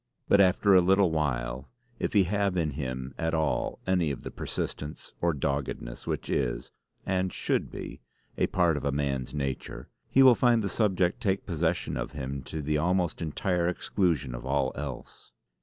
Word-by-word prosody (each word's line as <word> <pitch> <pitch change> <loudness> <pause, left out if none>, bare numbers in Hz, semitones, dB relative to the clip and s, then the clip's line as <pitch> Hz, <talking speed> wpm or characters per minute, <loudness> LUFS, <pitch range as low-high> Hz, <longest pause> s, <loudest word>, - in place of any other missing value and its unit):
But 100 - +6
after 95 +2 +4
a 90 - +8
little 95 0 +4
while, 65 -4 -1 0.3
if - - -1
he 100 -3 +6
have 100 0 0
in 80 -3 +1
him 65 -2 -4
at 80 0 0
all 80 -2 0
any 90 -4 +2
of 70 - -5
the - - -6
persistence 75 +1 -5
or 85 - +3
doggedness 70 -4 -3
which - - -2
is, 65 -4 -1 0.3
and 95 -1 0
should - - -1
be, - - -8 0.3
a - - +1
part 85 -4 +2
of 70 - -5
a 70 - +1
man's 70 -2 -2
nature, 70 -3 -4 0.2
he 135 - +6
will 130 -2 +9
find 120 -1 +3
the 100 - -1
subject 95 0 +1
take 100 -3 0
possession 85 -1 -1
of - - -4
him 70 -1 -4
to 80 +2 -5
the 75 +1 +1
almost 90 0 0
entire 85 +2 0
exclusion 85 -7 0
of - - -6
all 65 0 +1
else. 70 -2 -8
80 Hz, 175 wpm, -28 LUFS, 70-95 Hz, 0.3 s, will